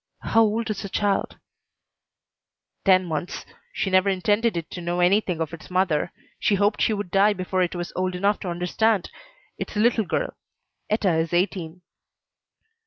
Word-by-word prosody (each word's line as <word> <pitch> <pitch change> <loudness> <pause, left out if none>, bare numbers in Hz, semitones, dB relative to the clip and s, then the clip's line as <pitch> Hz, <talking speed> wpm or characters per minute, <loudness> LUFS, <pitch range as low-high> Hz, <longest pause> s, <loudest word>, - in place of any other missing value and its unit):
"How 225 - +3
old 225 +1 +1
is 205 - -4
the 200 - -6
child?" 200 0 0 1.5
"Ten 185 -1 +5
months. 170 +1 -4 0.3
She 200 -3 -2
never 185 +1 +4
intended 205 +2 +1
it 165 -1 -5
to 180 - -6
know 175 +1 -2
anything 180 -1 +2
of 160 0 -3
its 165 +2 -10
mother. 180 -3 +1 0.3
She 205 - +2
hoped 205 +2 +1
she - - +3
would 205 -4 -4
die 200 +2 +4
before 185 -1 -1
it 180 0 0
was 175 0 -5
old 185 0 -1
enough 200 +3 +1
to 185 - -5
understand. 180 +4 0 0.5
It's - - -5
a - - +1
little 225 -1 +3
girl. - - -2 0.5
Etta 210 -4 +2
is 160 +1 -1
eighteen." 180 -1 -1
185 Hz, 170 wpm, -24 LUFS, 175-205 Hz, 1.5 s, Ten